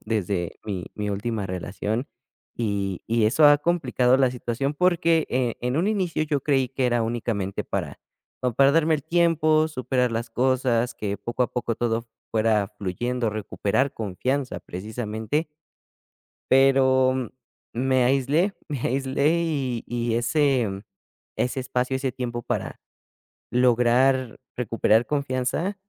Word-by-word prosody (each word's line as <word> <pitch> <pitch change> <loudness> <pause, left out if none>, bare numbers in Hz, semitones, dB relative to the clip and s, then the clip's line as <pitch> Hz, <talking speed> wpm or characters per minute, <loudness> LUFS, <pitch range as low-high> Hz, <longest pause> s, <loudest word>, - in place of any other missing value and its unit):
desde 100 -5 -2
mi 95 -4 -4
mi 105 -1 -3
última 105 0 -2
relación. 100 +7 -3 0.5
Y 100 -5 -2
y 115 -1 +2
eso 145 +8 +5
ha 145 - +7
complicado 135 -6 +2
la 130 -2 +3
situación, 125 +3 -3
porque, 170 -2 +2
eh, 125 -2 0
en 125 +5 0
un 185 - +2
inicio, 185 -7 0
yo 145 -2 -1
creí 135 -4 +2
que 135 0 -2
era 120 -1 +2
únicamente 110 -4 -2
para, - - -4 0.4
como 125 - +1
para 135 +4 +4
darme 160 0 +3
el 145 - -3
tiempo, 160 -1 +3
superar 130 -4 -1
las 115 +1 -2
cosas, 125 -1 +1
que 100 -1 -3
poco 120 +5 -2
a - - -2
poco 120 -2 -2
todo 115 0 -1 0.2
fuera 110 -2 +2
fluyendo, 120 +6 -2
recuperar 110 +4 -1
confianza, 125 +7 -2
precisamente 110 - -3 1.1
pero 130 -2 +4 0.4
me 130 +1 +2
aislé, 140 +9 +2
me 145 -5 -4
aislé, 135 +3 +1
y 135 -7 -2
y 120 -1 -1
ese 120 -5 +1 0.5
ese 125 +2 -1
espacio, 125 0 -1
ese 130 -1 -1
tiempo 120 -1 -4
para - - -4 0.7
lograr 125 +1 +3 0.2
recuperar 115 -1 +2
confianza 140 - -1
125 Hz, 130 wpm, -24 LUFS, 115-135 Hz, 1.1 s, ha